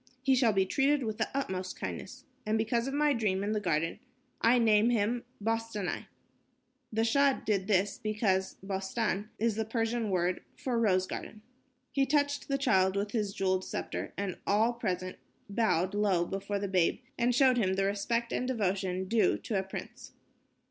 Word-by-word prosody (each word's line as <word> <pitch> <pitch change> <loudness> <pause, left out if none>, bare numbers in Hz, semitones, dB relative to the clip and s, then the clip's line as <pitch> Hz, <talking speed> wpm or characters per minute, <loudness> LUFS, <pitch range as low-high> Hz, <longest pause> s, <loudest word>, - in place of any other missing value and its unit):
He 265 0 +4
shall 250 -3 +4
be 195 -2 +2
treated 275 +6 +2
with 220 -1 -3
the 220 - 0
utmost 190 -9 -3
kindness. - - -6 0.2
And 215 +1 0
because 235 +2 0
of 270 - -3
my 295 0 +3
dream 205 -5 0
in 205 - -1
the 215 - +1
garden, 165 -2 -1 0.4
I 235 +2 +5
name 220 -1 +4
him 235 +1 0
Bostanai." 225 -3 -2 0.8
The 225 0 +1
Shah 275 +4 +4
did 195 -3 0
this 200 +1 +1
because 210 -4 0
"bostan" 195 +2 -2
is 230 +1 +1
the 220 - +1
Persian 225 0 -1
word 180 -1 0
for 245 -3 -1
rose 185 -5 +3
garden. 215 +3 -7 0.5
He 275 -1 +1
touched 285 0 +1
the 275 - +1
child 190 -8 +3
with 205 +1 -1
his 210 -3 -1
jeweled 185 -1 0
scepter - - -4
and 200 -3 -3
all 220 +4 +3
present 185 -6 -3 0.3
bowed 200 -3 +1
low 200 -4 +2
before 195 +2 -3
the 200 0 -2
babe 185 -3 +2 0.2
and 240 0 +1
showed 255 -1 +5
him 190 -5 +2
the 195 0 +1
respect 230 +4 -1
and 250 - -1
devotion 190 -5 -1
due 225 +2 +3
to 205 -4 -2
a - - +1
prince. 190 0 -8
215 Hz, 175 wpm, -30 LUFS, 190-235 Hz, 0.8 s, I